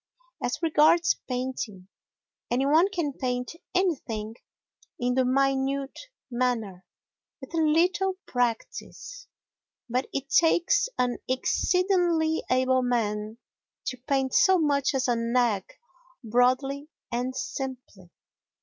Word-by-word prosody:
As 250 +7 -2
regards 330 +2 +4
painting, 250 -7 -4 0.6
any 250 +3 +1
one 320 +7 +4
can 340 -8 -2
paint 250 0 -3 0.2
anything 245 - -1 0.7
in 245 0 0
the 260 +1 +2
minute 275 - 0 0.2
manner 230 -7 -1 0.5
with 265 +3 -11
a - - -1
little 360 +5 +2
practice, 245 - -3 0.6
but 250 +2 -1
it 275 0 -3
takes 345 - +3
an 250 -1 0
exceedingly 345 +3 +1
able 255 0 +3
man 220 -3 -1 0.5
to 255 - -3
paint 270 -2 0
so 380 -1 +5
much 285 -4 +1
as 260 -1 +1
an 235 0 0
egg 230 -6 +1 0.5
broadly 255 +5 +1 0.2
and 250 +2 -2
simply. 255 -8 -6
260 Hz, 105 wpm, -27 LUFS, 245-315 Hz, 0.7 s, so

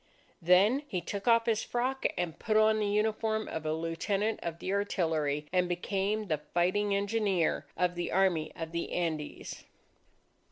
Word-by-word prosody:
Then, 190 - +5
he 185 - -2
took 195 +4 -6
off 230 -1 +5
his 225 -2 +1
frock, 255 +2 0 0.3
put 215 -1 +1
on 215 0 +4
the 210 - 0
uniform 220 +1 0
of 160 -1 -4
a - - +1
lieutenant 165 +7 -1
of 170 -1 -4
the 185 - -3
artillery, 160 -7 0
and 180 -1 +2
became 195 +4 -1
the 155 -6 -1 0.2
fighting 200 +4 +2
engineer 200 -7 0
of 180 0 +1
the 175 0 -3
Army 180 -5 +2
of 165 -1 -5
the 170 0 -3
Andes. 160 -4 -3
195 Hz, 155 wpm, -30 LUFS, 170-215 Hz, 0.3 s, Then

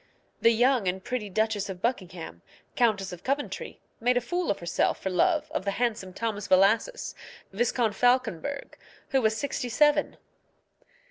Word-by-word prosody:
The 230 - +6
young 240 -2 +3
and 185 +1 -1
pretty 240 -5 -3
Duchess 215 0 0
of 185 -2 -6
Buckingham, 180 - -3 0.3
Countess 205 -6 +1
of 175 - -10
Coventry, 280 +2 -3 0.2
made 245 +2 +2
a - - +5
fool 350 +8 -2
of 200 - +1
herself 170 -1 0
for 190 - -3
love 310 - +2
of - - -2
the 200 - -1
handsome 220 -6 -1
Thomas 205 0 -3
Bellasys, 215 - +3 0.4
Viscount 230 0 +1
Falconberg, 250 - 0 0.3
who 270 - +2
was 220 -1 +2
sixty 265 -2 -3
seven. 295 +5 +3
225 Hz, 150 wpm, -27 LUFS, 195-255 Hz, 0.4 s, The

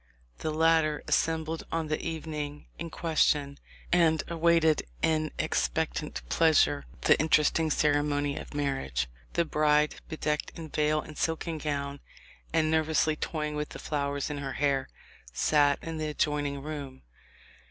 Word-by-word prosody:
The 155 - -2
latter 155 -1 +2
assembled 160 0 0
on 165 -1 -1
the 155 0 -1
evening 150 -3 -5
in 170 - -4
question, 150 -3 +1 0.3
and 165 -2 +4
awaited 165 -2 +3 0.2
in 155 -1 +2
expectant - - -1
pleasure 75 - +3 0.2
the - - +4
interesting 155 +1 +3
ceremony 145 -1 +1
of - - -8
marriage. 135 - -1 0.3
The 170 - +2
bride, 150 -1 +3 0.2
be 160 - -5
decked 150 -1 -1
in 160 -2 -7
veil 150 +1 +1
and 155 - -10
silken 165 0 -1
gown, 140 -1 -3 0.5
and 160 -1 +2
nervously 155 0 +2
toy 155 0 -3
ing 150 - -6
with 150 0 -3
the - - -8
flowers 140 -1 -2
in 145 - -4
her 135 -1 -4
hair, 140 -2 0 0.4
sat 145 - +3
in 165 -1 -5
the 155 - -1
adjoin 150 -1 0
ing 140 -1 -5
room. 145 -4 -6
150 Hz, 145 wpm, -29 LUFS, 145-160 Hz, 0.5 s, and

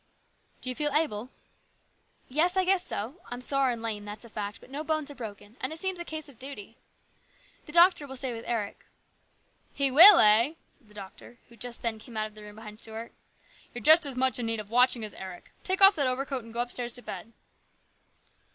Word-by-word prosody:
" - - -37
Do 255 - -4
you - - -2
feel 295 +1 -1
able? 255 -7 -1 0.3
" - - -41
" - - -39
Yes, 340 +7 +1
I 375 - +2
guess 375 -1 +2
so; 255 - -6
I'm 245 - -6
sore 270 +1 0
and 235 -2 -4
lame, 215 -2 -3
that's 210 +2 -9
a - - -13
fact, 205 -1 -6
but - - -18
no 290 +3 -5
bones 310 -2 -2
are - - -9
broken, 220 -2 -10
and 260 - -3
it 315 - -6
seems 380 +1 -3
a - - -4
case 315 -2 -7
of 265 -5 -17
duty. 245 -5 -9 0.9
The - - -9
doctor 340 -3 +4
will 265 - -9
stay 260 -1 -3
with 230 0 -8
Eric." 220 -4 -4 0.5
" - - -39
He 275 -1 +3
will, 350 +8 +10
eh!" 230 +7 +6 0.2
said 250 - -23
the 210 - -21
doctor, 200 +4 -12
who 235 - -17
just 235 +1 -8
then 225 -2 -2
came 230 0 -11
out 215 - -1
of 215 - -10
the 215 - -12
room 210 0 -12
behind 215 -1 -11
Stuart. 225 +1 -8 0.3
" - - -27
You're 240 - -7
as 310 -4 +8
much 260 0 +1
in 235 - -3
need 225 -1 -1
of 210 0 -9
watching 245 -1 +3
as 210 - -10
Eric. 185 -2 -10
Take 380 +1 -1
off 390 +1 +9
that 280 -3 +1
overcoat 260 0 -3
and 230 - -13
go 235 +1 -2
upstairs 245 -1 -4
to 245 - -7
bed 195 +4 -8
245 Hz, 235 wpm, -27 LUFS, 220-295 Hz, 0.9 s, will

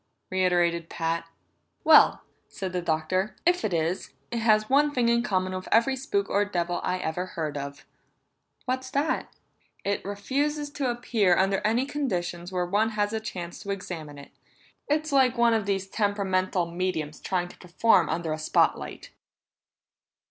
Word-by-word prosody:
reiterated 175 -3 +1
Pat. 165 0 -2 0.6
"Well," 315 -1 +6 0.2
said 190 -2 -6
the 180 - -1
Doctor, 180 +5 -1
"if 355 +1 +3
it 210 - 0
is, 165 +2 -1 0.2
it 235 - -1
has 215 -1 +3
one 290 +3 +3
thing 240 -2 +3
in 235 0 +3
common 185 -5 -1
with 185 0 -5
every 235 +4 +4
spook 200 -7 -1
or 205 - +2
devil 175 -3 -2
I 185 - 0
ever 180 +1 -3
heard 155 -5 -4
of." 140 0 -6 0.8
"What's 260 0 -2
that?" 285 +4 -1 0.5
"It 200 0 -1
refuses 285 +9 -2
to 275 -3 -1
appear 230 -6 +2
under 195 +1 +2
any 230 +5 +2
conditions 180 -11 -3
where 180 -1 0
one 205 +5 +1
has 205 +1 +1
a 220 - 0
chance 180 -6 -6
to 200 - -9
examine 165 -7 -5
it. 140 - -12 0.6
It's 305 +1 0
like 260 -3 +4
one 235 -1 +4
of 215 -3 0
these 195 -1 0
temperamental 190 -3 0
mediums 170 -4 -2
trying 180 -2 -2
to - - -15
perform 180 -1 +3
under 160 0 -1
a 155 - -4
spot 155 - +2
light." - - -9
195 Hz, 165 wpm, -27 LUFS, 175-235 Hz, 0.8 s, Well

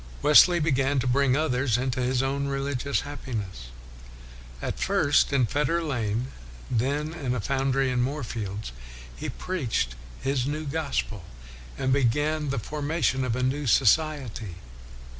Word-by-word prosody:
Wesley 170 +4 +7
began 140 -2 +1
to 130 - 0
bring 130 +1 +3
others 130 -6 +1
into 130 0 -1
his 125 +1 +1
own 140 +1 -1
religious 140 0 -1
happi 135 -3 -6
ness. 95 - -5 0.9
At - - -4
first 165 -9 +3
in 135 -3 +3
Fetter 150 +7 0
Lane, 120 -4 -2 0.4
then 140 +6 0
in 135 -7 -2
a - - -2
foundry 135 +2 +1
in 125 -1 +1
Moorfields, 115 - -3 0.4
he - - -5
preached 125 - -2 0.3
his 135 -1 0
new 155 +2 -3
gospel, 140 - -2 0.5
and 130 0 +1
began 145 +4 +1
the 135 - -1
formation 145 +2 -1
of 120 -3 -1
a 125 - -1
new 135 +2 -1
society. 120 - +2
135 Hz, 140 wpm, -26 LUFS, 125-145 Hz, 0.9 s, Wesley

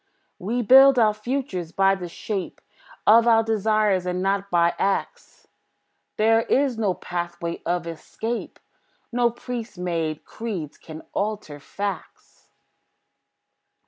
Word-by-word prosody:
We 235 +6 -2
build 265 +3 +7
our 215 -3 +4
futures 215 - -4
by 195 +1 +3
the 180 -3 -5
shape 195 +2 -5 0.5
Of 230 +2 +6
our 225 -1 +5
desires, 215 -3 +1
and 180 0 -1
not 195 +1 0
by 170 -1 +3
acts. 195 0 -3 0.7
There 225 +1 +4
is 265 +2 +1
no 205 -5 0
pathway 175 -1 -5
of 175 -1 -1
escape; 220 +8 -5 0.5
No 240 0 +2
priest 235 -2 -7
made 165 -4 -3
creeds 190 -10 -6
can 160 0 -10
alter 205 -8 -3
facts. 200 +4 -7
200 Hz, 115 wpm, -24 LUFS, 175-225 Hz, 0.7 s, build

